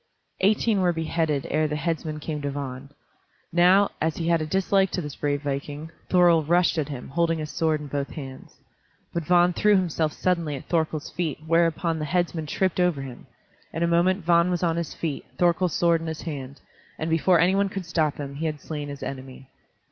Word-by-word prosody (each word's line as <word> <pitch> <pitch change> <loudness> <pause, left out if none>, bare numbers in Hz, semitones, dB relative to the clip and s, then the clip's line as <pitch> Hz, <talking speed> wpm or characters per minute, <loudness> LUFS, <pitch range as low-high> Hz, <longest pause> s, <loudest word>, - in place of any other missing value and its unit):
Eighteen 210 +1 +2
were 175 -1 +3
beheaded 160 -3 -1
ere 155 0 +2
the 150 - -3
headsman 155 0 -2
came 150 0 -4
to 145 - -2
Vagn. 140 -1 -6 0.6
Now, 185 +4 +5
as 160 0 0
he 165 -1 -1
had 170 -1 +3
a 155 - -3
dislike 195 +2 +2
to 180 - -1
this 150 -3 -6
brave 145 0 -1
viking, 145 +3 -4 0.2
Thorkel 175 -3 +5
rushed 170 +2 +2
at 150 -1 -2
him, 135 -4 -7
holding 165 +2 +1
his 155 -1 -5
sword 160 -2 +1
in - - -7
both 140 -1 -3
hands. 135 -4 -9 0.6
But 170 -2 -2
Vagn 175 +1 +4
threw 210 0 +4
himself 165 -4 +1
suddenly 170 -5 0
at 135 - -8
Thorkel's 160 -3 -1
feet, 160 -4 -3
whereupon 165 0 +1
the 155 - -2
headsman 170 -1 -1
tripped 185 +4 0
over 175 -6 +1
him. 130 -1 -10 0.4
In 165 - -2
a - - +3
moment 175 +2 +2
Vagn 170 0 +4
was 180 -1 -1
on 165 -2 +2
his 170 -1 -3
feet, 155 -4 -3
Thorkel's 175 0 +2
sword 170 -1 +3
in 165 - -5
his 160 -1 -5
hand, 140 -4 -6 0.4
and 160 - -3
before 165 +2 +3
any 180 +3 +4
one 200 0 +2
could 190 -2 -5
stop 160 -3 0
him 140 -1 -6
he 160 +2 -1
had 150 -1 -4
slain 150 -1 -5
his 140 -1 -7
enemy. 130 0 -8
165 Hz, 205 wpm, -25 LUFS, 150-175 Hz, 0.6 s, Now